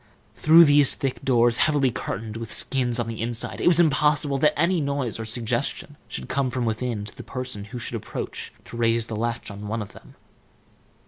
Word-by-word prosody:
Through 165 +2 +7
these 145 -2 +5
thick 135 -2 -3
doors, 120 -2 +3
heavily 145 -4 +2
curtained 110 -3 -5
with 115 -1 -6
skins 125 -3 0
on 120 - -1
the 115 -1 -5
inside, 115 0 -3
it - - +1
was 175 -1 +6
impossible 150 -3 +2
that 150 +1 +3
any 170 +1 +2
noise 140 -5 -2
or 110 - -4
suggestion 115 0 -2
should 65 - -6
come 135 -1 0
from 125 -1 -2
within 110 -1 -2
to - - -11
the - - -8
person 125 -5 -5
who 120 +4 -8
should 120 - -3
approach - - -6
to - - -9
raise 115 -1 +2
the 110 - -6
latch 115 0 -3
of 100 0 -9
one 105 +2 -3
of 100 - -13
them. - - -16
120 Hz, 200 wpm, -24 LUFS, 115-140 Hz, -, Through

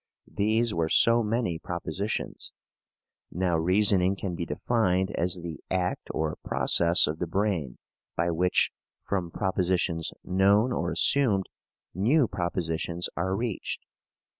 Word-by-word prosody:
These 110 +2 +1
were 80 -1 0
so 115 +6 +5
many 110 -6 -1
propositions. 90 +3 -4 0.8
Now 90 0 0
reasoning 95 +2 +3
can 95 -2 -4
be 85 -1 -4
defined 95 -5 0
as 90 +2 0
the 80 -4 -6
act 90 -1 -2
or 80 -1 -2
process 85 0 +3
of 80 +2 -3
the 90 - -2
brain 90 - -1 0.4
by 85 0 +1
which, 90 +2 +2 0.3
from 90 -4 -2
propositions 90 -3 -1
known 100 +6 +3
or - - -1
assumed, 110 -9 +2 0.4
new 125 - +3
propositions 85 -1 -2
are 95 +2 -1
reached. 115 -1 -4
90 Hz, 120 wpm, -27 LUFS, 85-105 Hz, 0.8 s, so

